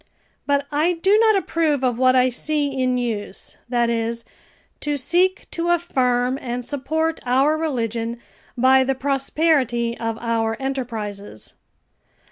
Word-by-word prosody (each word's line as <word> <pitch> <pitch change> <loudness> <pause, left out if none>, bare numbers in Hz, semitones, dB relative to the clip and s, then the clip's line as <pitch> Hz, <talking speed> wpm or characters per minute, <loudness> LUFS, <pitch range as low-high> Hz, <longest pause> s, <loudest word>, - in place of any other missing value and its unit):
But 285 0 +1
I 310 +5 +2
do 385 +4 +2
not 445 -1 +5
approve 320 -7 0
of 245 -2 0
what 255 0 +4
I 255 0 +4
see 295 +3 -1
in 255 -2 0
use, 220 -5 -4
that 240 -1 +2
is, 230 0 -2 0.5
to 295 -1 -1
seek 350 +7 +1
to 340 0 -2
affirm 260 -7 +1
and 245 0 -4
support 315 +4 -1
our 265 +5 +3
religion 235 -7 -2 0.4
by 260 +2 +5
the 265 +1 0
prosperity 270 -3 +1
of 225 -1 -2
our 225 -1 -1
enterprises. 225 - -5
260 Hz, 130 wpm, -22 LUFS, 235-300 Hz, 0.5 s, not